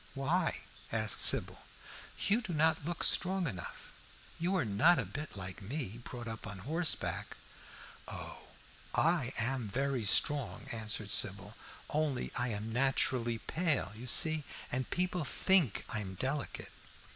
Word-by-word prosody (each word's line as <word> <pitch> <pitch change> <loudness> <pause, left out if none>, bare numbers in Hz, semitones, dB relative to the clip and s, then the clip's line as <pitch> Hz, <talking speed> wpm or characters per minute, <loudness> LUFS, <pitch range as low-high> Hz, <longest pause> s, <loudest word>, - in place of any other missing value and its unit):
"Why?" 155 +7 0 0.3
asked - - +3
Sybil. - - +6 0.6
"You 215 +4 +3
do 190 -7 -5
not 160 0 +2
look 175 +1 -3
strong 190 0 +3
enough. 95 - -7 0.5
You 175 +3 0
are 170 -8 +1
not 115 +13 +4
a - - -1
bit 145 -7 -7
like 95 +1 -6
me, 120 0 -4
brought 120 -1 -7
up 110 -1 -6
on 100 -2 -6
horseback." 165 +3 -2 0.7
"Oh, - - -7 0.6
I 160 -6 +2
am 120 0 -1
very 135 +2 -1
strong," 140 +5 +3
answered 110 -2 -2
Sybil, 100 +1 +1 0.3
"only 150 -4 -1
I 120 - 0
am 110 0 -4
naturally 125 -2 +1
pale, 145 - -1
you 120 +3 -9
see, 155 +4 +3 0.3
and 130 0 -2
people 180 -1 -1
think 165 - +2
I 110 -3 -2
am 95 -2 -5
delicate." 135 +7 -3
130 Hz, 140 wpm, -33 LUFS, 110-160 Hz, 0.7 s, Sybil